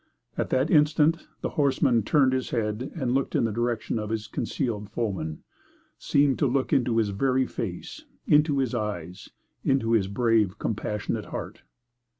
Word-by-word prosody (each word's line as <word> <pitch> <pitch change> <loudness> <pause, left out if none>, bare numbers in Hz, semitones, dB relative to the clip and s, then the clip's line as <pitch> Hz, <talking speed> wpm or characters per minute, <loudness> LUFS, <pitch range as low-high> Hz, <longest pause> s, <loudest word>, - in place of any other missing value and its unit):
At - - -2
that 130 +3 +1
instant 155 +1 +3
the - - -1
horseman 135 -4 +2
turned 130 +4 +3
his 130 -1 -1
head 115 +2 -2
and 130 -6 -1
looked 135 0 0
in - - +3
the 115 - 0
direction 120 0 -1
of 105 -1 -4
his 110 -1 -2
concealed 115 -4 -3
foeman 95 -9 -3 0.6
seemed 140 -1 +2
to 145 - +3
look 130 +1 0
into 120 -3 +2
his 110 -2 +2
very 130 +6 +1
face, 90 -8 -6 0.2
into 150 -1 +4
his 130 -3 0
eyes, 100 -6 -4 0.3
into 135 -4 +1
his 110 -4 +3
brave, 105 -2 +1
compassionate 105 -2 -3
heart. - - -7
120 Hz, 155 wpm, -26 LUFS, 105-135 Hz, 0.6 s, into